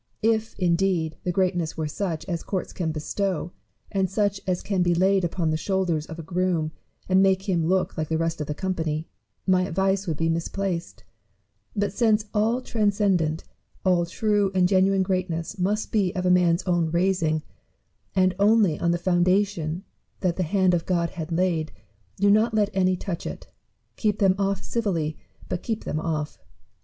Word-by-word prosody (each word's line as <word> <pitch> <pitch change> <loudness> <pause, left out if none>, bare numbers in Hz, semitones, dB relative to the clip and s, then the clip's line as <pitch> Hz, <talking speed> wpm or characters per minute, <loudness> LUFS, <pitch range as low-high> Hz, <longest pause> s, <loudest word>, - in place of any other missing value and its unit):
If 225 0 +1
indeed 175 -3 +1
the 180 - 0
greatness 175 -3 0
were 160 - -1
such 165 0 -3
as 170 -3 -3
courts 190 -3 -4
can 165 -3 -2
bestow, 170 +2 -2 0.4
and 190 -2 +1
such 200 0 0
as 180 -1 0
can 195 -3 0
be 175 -1 +3
laid 190 -1 +2
on 165 -4 +1
the 155 - +1
shoulders 175 -3 -1
of 160 - -8
a 165 - -6
groom 175 -2 0 0.4
and 185 0 +4
make 190 +1 +2
him 175 -4 +1
look 185 +1 +1
like 155 - -1
the 160 - +1
rest 165 -1 -1
of 150 - -3
the 150 - -3
company, 160 -3 -2 0.4
my 185 -1 +4
advice 195 +2 0
would 160 -3 -1
be 165 - 0
misplaced; 170 +2 -2 0.7
but 205 -1 0
since 215 -1 +2
all 225 +4 +2
transcendent, 200 -8 +1 0.4
all 175 -2 +3
true 205 +2 +1
and 180 -1 +4
genuine 190 0 +3
greatness 185 0 -2
must 205 +4 0
be 200 -5 +2
of 185 -1 -2
a 180 - +4
man's 175 -1 +3
OAvn 175 -3 +1
raising, 170 -3 +1 0.7
and 185 -1 +3
only 205 -5 +4
on 170 - +1
the 170 - +2
foundation 180 -1 +1 0.4
that 180 -3 +1
the - - -2
hand 185 +1 +2
of 170 -2 0
God 170 -2 +1
has 160 -2 -6
laid, 165 -2 0 0.5
do 200 +1 +4
not 220 +2 +3
let 210 -1 +2
any 185 -1 +2
touch 180 -1 -5
it: - - -8 0.5
keep 210 -2 +1
them 195 -2 +4
ofiT 195 -1 0
civilly, 170 -10 -1 0.3
but 175 - -3
keep 225 -2 -3
them - - -3
oflT. 155 -2 -3
185 Hz, 175 wpm, -25 LUFS, 165-195 Hz, 0.7 s, and